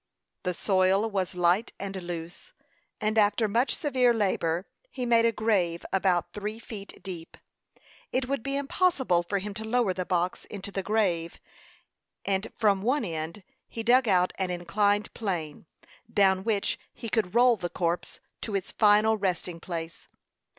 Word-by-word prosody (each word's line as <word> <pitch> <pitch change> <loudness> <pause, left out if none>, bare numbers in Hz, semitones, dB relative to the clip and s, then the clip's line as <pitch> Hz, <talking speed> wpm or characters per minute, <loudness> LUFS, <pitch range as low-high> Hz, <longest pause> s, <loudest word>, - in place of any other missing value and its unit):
The 180 -1 -2
soil 190 +3 +2
was 190 -4 -2
light 180 +5 +2
and 195 0 -5
loose, 175 - -7 0.5
and 215 +1 +1
after 210 +2 +3
much 235 +6 +1
severe 255 -5 +2
labor, 185 -4 0 0.2
he 255 - -4
made 230 -1 +4
a 230 - +4
grave 195 -7 0
about 185 -2 +1
three 210 +1 -4
feet 210 -3 -9
deep. 175 -4 -8 0.7
It 255 0 0
would 275 -2 -1
be 275 +4 -2
impossible 280 - +2
for 185 +4 -2
him 200 +1 -4
to 220 +2 -6
lower 220 -3 +1
the 185 - -2
box 180 -1 -1
into 200 0 -7
the 195 - -2
grave; 185 -5 0 0.9
and, 195 0 -1
from 205 -4 +3
one 250 +4 +1
end, 165 +3 -4 0.2
he 225 - -5
dug 245 +2 +4
out 180 -2 +3
an 190 -1 0
inclined 205 +4 0
plane, 170 -8 -4 0.4
down 190 -2 +3
which 210 -2 0 0.2
he 230 - -6
could 220 -3 -1
roll 245 0 +6
the 180 -4 -4
corpse 170 0 -2 0.2
to 215 - -3
its 195 -1 -2
final 215 +1 +4
resting 180 -3 -2
place. 165 -2 -6
200 Hz, 155 wpm, -28 LUFS, 180-225 Hz, 0.9 s, roll